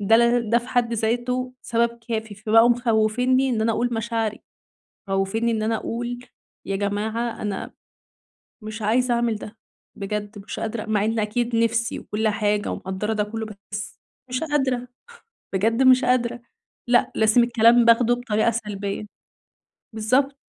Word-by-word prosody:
ده 205 +3 +5
ل 235 -1 +2
ده 235 - +5
في 240 - -11
حد 245 -2 +1
ذاته 245 +3 -1
سبب 235 0 0
كافي 220 -2 -3
فبقوا 225 +3 +4
مخوّفينّي 245 +2 +2
إن 230 -3 0
أنا 225 +1 +2
أقول 240 +2 -1
مشاعري، 225 -1 -2 0.7
مخوّفينّي 195 +5 0
إن 215 -1 -1
أنا 225 +1 +1
أقول 240 +2 -4 0.5
يا 195 - -2
جماعة 215 +4 -2
أنا 205 -2 -4 0.9
مش 215 +1 -7
عايزة 240 +4 +2
أعمل 235 -2 +1
ده، 215 +1 -9 0.4
بجد 205 +1 -4
مش 200 +1 -7
قادرة 225 0 -3
مع 210 -1 +1
إن 225 +1 0
أكيد 230 +3 -1
نفسي 230 0 +1
وكل 220 +1 -2
حاجة 210 -1 0
ومقدّرة 190 +4 -3
ده 210 -1 0
كله 220 +1 -5
بس 215 - -9 0.7
مش 250 0 -2
قادرة، 265 -5 0 0.7
بجد 225 +6 +2
مش 255 0 +6
قادرة، 245 -1 +1 0.5
لأ 240 0 +3
لازم 220 +2 +4
الكلام 235 0 +5
باخده 235 +1 +5
بطريقة 230 -2 +1
سلبية 205 -2 -4 0.9
بالضبط. 260 +6 +1
230 Hz, 145 wpm, -23 LUFS, 215-240 Hz, 0.9 s, مش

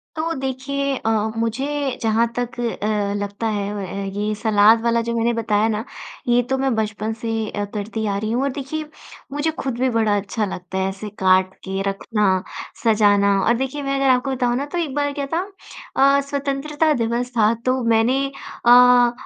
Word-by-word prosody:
तो 330 +1 -1
देखिए 275 0 -2
अ, 225 - -2 0.3
मुझे 270 +4 -1
जहाँ 225 +1 +2
तक 245 0 -3
अ, 210 -3 -1
लगता 205 +2 -3
है 205 -1 -2
व - - -4
अ, 195 +2 -5
ये 210 +1 -1
सलाद 220 0 +4
वाला 235 0 +2
जो 235 0 -3
मैंने 230 +1 +1
बताया 220 -2 +1
ना, 215 0 -1 0.4
ये 240 0 +4
तो 265 - +1
मैं 265 -2 +1
बचपन 215 0 -2
से 225 -2 -2
अ, 205 0 -3
करती 220 +1 -3
आ 200 -1 -1
रही 215 +2 -2
हूँ 245 +3 0
और 280 - +1
देखिए 290 +4 -5 0.5
मुझे 290 +3 0
खुद 265 -3 -2
भी 260 +1 +2
बड़ा 220 -3 +2
अच्छा 205 +2 -2
लगता 185 -1 -6
है 190 0 0
ऐसे 195 +2 -7
काट 185 0 +3
के 195 0 -3
रखना, 195 -2 0 0.4
सजाना। 205 -3 +4
और 235 - +3
देखिए 265 +3 -3
मैं 275 0 -1
अगर 275 0 +2
आपको 255 +1 +2
बताऊँ 245 -1 +1
ना 280 - -2
तो 295 +4 -5
एक 320 -6 -2
बार 285 -1 0
क्या 280 -1 -3
था 335 - +2 0.8
अ, - - +2
स्वतंत्रता 290 +2 0
दिवस 240 +2 -2
था 215 +1 +4
तो 255 0 +1
मैंने 230 +4 +2 0.4
अ, 245 0 +7
230 Hz, 190 wpm, -21 LUFS, 210-270 Hz, 0.8 s, अ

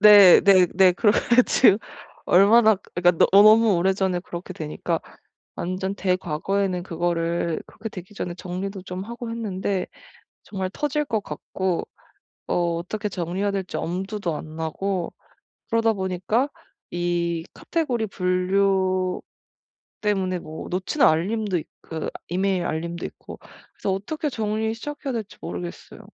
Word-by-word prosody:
네 205 -3 +9
네 190 -3 +6
네. 185 -1 +6
그래 205 +3 +3
가지고 235 -4 +4 0.5
얼마나 215 +4 +6 0.2
그러니까 175 -1 +4
너-너무 215 +1 +7
오래전에 190 0 +1
그렇게 175 +1 -7
되니까 155 -3 -3 0.5
완전 185 +2 -3
대과거에는 185 0 -1
그거를 170 -1 -1
그렇게 220 +1 -8
되기 185 +1 -10
전에 175 -3 -4
정리도 185 +2 -5
좀 185 +1 -6
하고 235 +1 -6
했는데 200 -4 -2 0.6
정말 190 -2 -4
터질 300 +3 -1
것 225 -6 -1
같고 185 -2 -3 0.6
어 - - 0 0.2
어떻게 210 +5 -4
정리해야 185 +2 -2
될지 195 -2 -3
엄두도 185 -1 -3
안 155 0 -8
나고 175 +3 -3 0.6
그러다 225 0 +2
보니까 190 +7 0 0.4
이 175 -1 -1
카테고리 255 -10 -1
분류 185 0 +1 0.8
때문에 190 -3 0
뭐 155 -1 -8
놓치는 185 +11 +1
알림도 190 +4 +1
있 - - -9 0.2
그 160 -1 -4 0.2
이메일 185 0 0
알림도 170 +1 -3
있고 - - -11 0.4
그래서 195 - -2
어떻게 295 +11 -2
정리를 220 -2 -1
시작해야 290 +3 -5
될지 220 -3 -5
모르겠어요. 175 +1 -7
190 Hz, 300 characters per minute, -24 LUFS, 175-210 Hz, 0.8 s, 네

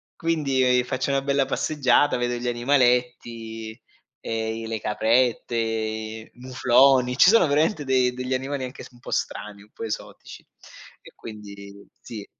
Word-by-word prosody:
quindi, 150 -6 0
e 125 -1 +3
ehm, - - +1
faccio 130 +2 -2
una 140 0 +1
bella 140 0 +1
passeggiata, 145 -2 +1
vedo 120 0 -1
gli 120 +1 -4
animaletti, 120 -3 0 0.4
ehm, 110 0 -3
i 115 - -6
le 110 -1 -3
caprette, 110 -1 -1
mufloni, 130 0 +3
ci 180 - +7
sono 230 -2 +5
veramente 150 +3 +1
de 130 -2 +2
degli 125 +1 -4
animali 135 +1 -3
anche 130 +1 -8
s - - -12
un 120 - -20
po' - - -10
strani, 105 -1 -4
un 105 - -23
po' - - -8
esotici; 110 -2 -7 0.6
e - - -15
quindi 100 -2 -11 0.2
sì. 105 -4 -8
125 Hz, 155 wpm, -24 LUFS, 110-130 Hz, 0.6 s, ci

